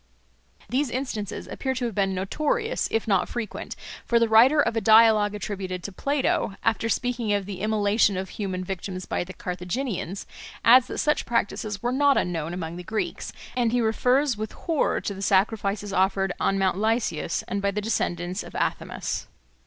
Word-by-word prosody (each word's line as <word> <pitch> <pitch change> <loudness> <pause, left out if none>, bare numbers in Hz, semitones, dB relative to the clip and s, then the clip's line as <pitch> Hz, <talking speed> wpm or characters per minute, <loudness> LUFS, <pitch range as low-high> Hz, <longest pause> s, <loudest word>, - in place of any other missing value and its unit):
These 265 +3 0
instances 230 -6 -4
appear 265 -1 -3
to 250 -1 -2
have 230 - -3
been 195 -1 0
notorious, 305 - -1
if 225 - -1
not 195 -4 +2
frequent; 235 -4 -5 0.3
for 235 - +2
the 230 0 +3
writer 240 +7 +6
of 230 -5 +2
a 225 - +1
dialogue 215 -1 +6
attributed 190 -3 -4
to 200 - -5
Plato, 270 -2 0
after 225 0 +1
speaking 240 -2 0
of 200 -1 0
the 190 -2 -6
immolation 210 -1 +2
of 190 0 -4
human 185 -3 -4
victims 185 0 -5
by - - -1
the 180 - -9
Carthaginians, 195 0 -4 0.4
adds 245 +2 +7
that - - -6
such 300 - +1
practices 210 -2 -1
were 240 - +1
not 280 +1 +4
unknown 165 -2 -1
among 170 -1 -5
the 180 - -7
Greeks, 220 +4 -3 0.2
and 240 -2 +2
he 245 - +2
refers 250 +4 +2
with 215 0 -5
horror 325 -4 0
to 200 - -3
the 195 - -8
sacrifices 200 0 +1
offered 190 0 +2
on 195 - +1
Mount 190 -1 +1
Lycaeus 220 -7 0
and 200 +1 -2
by 200 - +1
the 200 +1 -2
descendants 180 -3 -1
of - - -11
Athamas. - - -2
210 Hz, 175 wpm, -25 LUFS, 190-235 Hz, 0.4 s, adds